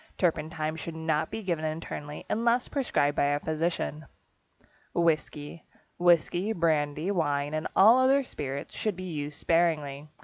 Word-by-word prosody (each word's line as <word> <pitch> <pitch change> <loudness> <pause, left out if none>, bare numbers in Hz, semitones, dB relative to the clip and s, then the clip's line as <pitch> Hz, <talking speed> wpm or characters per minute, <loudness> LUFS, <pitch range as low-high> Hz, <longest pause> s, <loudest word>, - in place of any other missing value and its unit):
Turpentine 160 -2 -1
should 165 0 -6
not 160 -1 0
be 220 - -5
given 170 -4 -1
internally, 155 -1 -5
unless 235 +2 +1
prescribed 145 - 0
by - - +2
a 145 0 +1
physician. 155 -1 -2 0.9
=Whisky.= 155 -1 -1 0.4
Whisky, 175 +4 +3
brandy, 155 -1 +1
wine, 145 -5 0
and 155 +1 -1
all 225 +6 +7
other 270 +2 +4
spirits 140 - -6
should 215 -3 -1
be 185 - -7
used 150 -4 -5
sparingly. 155 -4 +1
160 Hz, 135 wpm, -28 LUFS, 150-180 Hz, 0.9 s, all